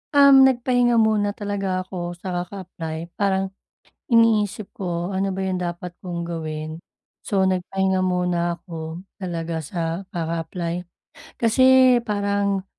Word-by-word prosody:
Um, 280 Hz, -1 st, +8 dB
nagpahinga 245 Hz, -1 st, +2 dB
muna 215 Hz, -2 st, +2 dB
talaga 195 Hz, -3 st, -2 dB
ako 175 Hz, -2 st, -5 dB
sa 175 Hz, -, -10 dB
kaka-apply, 175 Hz, -3 st, -6 dB
parang, 195 Hz, -1 st, +1 dB, 0.6 s
iniisip 215 Hz, -3 st, +3 dB
ko 175 Hz, -1 st, -3 dB
ano 195 Hz, 0 st, 0 dB
ba 190 Hz, -, -4 dB
yung 190 Hz, -1 st, -1 dB
dapat 175 Hz, 0 st, -5 dB
kong 175 Hz, -2 st, -4 dB
gawin. 155 Hz, -1 st, -5 dB, 0.5 s
So, 195 Hz, -2 st, +2 dB
nagpahinga 190 Hz, 0 st, +1 dB
muna 180 Hz, -1 st, 0 dB
ako, 165 Hz, -1 st, -7 dB, 0.2 s
talaga 170 Hz, -3 st, -3 dB
sa 165 Hz, +3 st, -3 dB
kaka-apply 170 Hz, +1 st, -3 dB, 0.5 s
kasi 230 Hz, +3 st, +3 dB, 0.4 s
parang 200 Hz, -2 st, 0 dB
185 Hz, 115 wpm, -23 LUFS, 170-200 Hz, 0.6 s, Um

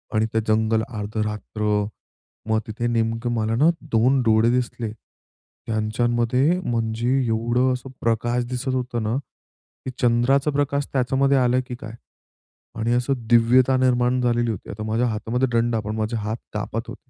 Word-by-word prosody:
आणि 110 Hz, -, +3 dB
ते 110 Hz, -, +2 dB
जंगल 110 Hz, 0 st, +2 dB
अर्ध 105 Hz, -1 st, -6 dB
रात्र. 105 Hz, 0 st, -1 dB, 0.7 s
मग 110 Hz, 0 st, +3 dB
तिथे 115 Hz, +2 st, -3 dB
नेमकं 115 Hz, +1 st, 0 dB
मला 110 Hz, 0 st, 0 dB
ना 150 Hz, +7 st, +4 dB, 0.2 s
2 125 Hz, +4 st, +3 dB
डोळे 110 Hz, 0 st, +4 dB
दिसले. 120 Hz, -2 st, -2 dB, 0.8 s
त्यांच्यांमध्ये 120 Hz, +8 st, +1 dB
म्हणजे 115 Hz, -3 st, -1 dB, 0.2 s
एवढं 120 Hz, +3 st, +1 dB
असं 125 Hz, +1 st, -6 dB
प्रकाश 120 Hz, +2 st, 0 dB
दिसतं 130 Hz, +1 st, -2 dB
होत 125 Hz, -1 st, -3 dB
ना, 110 Hz, +3 st, -1 dB, 0.7 s
की 130 Hz, -, -3 dB
चंद्राचं 125 Hz, +4 st, +3 dB
प्रकाश 140 Hz, 0 st, 0 dB
त्याच्यामध्ये 135 Hz, +1 st, +2 dB
आलं, 125 Hz, 0 st, +3 dB
की 125 Hz, -, -5 dB
काय 115 Hz, -2 st, -9 dB, 0.9 s
आणि 115 Hz, +2 st, +1 dB
असं 125 Hz, +3 st, +1 dB, 0.2 s
दिव्यता 120 Hz, +3 st, +5 dB
निर्माण 125 Hz, 0 st, +2 dB
झालेली 120 Hz, -1 st, +1 dB
होती. 105 Hz, -, -7 dB
आता 105 Hz, +1 st, -6 dB
माझ्या 115 Hz, +3 st, 0 dB
हातामध्ये 115 Hz, +3 st, -1 dB
दंडा 115 Hz, 0 st, +2 dB
पण 105 Hz, +1 st, -4 dB
माझे 110 Hz, +1 st, -1 dB
हात 110 Hz, +2 st, -3 dB, 0.2 s
कापत 105 Hz, +2 st, -4 dB
होतं. 125 Hz, +2 st, -11 dB
120 Hz, 150 wpm, -23 LUFS, 110-125 Hz, 0.9 s, दिव्यता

